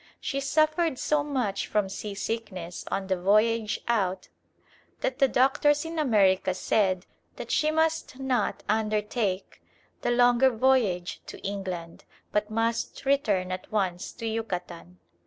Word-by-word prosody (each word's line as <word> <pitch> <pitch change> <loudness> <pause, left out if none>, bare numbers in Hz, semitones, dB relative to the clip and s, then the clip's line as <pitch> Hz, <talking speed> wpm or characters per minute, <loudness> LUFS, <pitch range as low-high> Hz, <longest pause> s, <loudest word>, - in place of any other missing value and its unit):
She 275 - -2
suffered 310 +1 +2
so 300 +2 +1
much 255 -9 -2
from 210 -2 +1
seasickness 200 -3 -5
on 195 - -2
the 190 -2 -1
voyage 215 +3 +2
out 195 -6 0 0.7
that 260 +1 -1
the 270 - +6
doctors 285 +4 +3
in 325 0 -4
America 195 -9 +3
said 185 -1 +1 0.3
that - - -7
she 305 - +2
must 320 -3 0
not 260 -5 -1
undertake 215 -2 -1 0.4
the - - 0
longer 245 +1 +5
voyage 225 -8 +1
to - - -8
England, 185 -4 -5 0.3
but 210 0 0
must 225 +4 -1
return 210 -10 +1
at 185 0 -6
once 185 -4 -1
to 230 - -7
Yucatan. 180 - -4
220 Hz, 130 wpm, -27 LUFS, 190-265 Hz, 0.7 s, the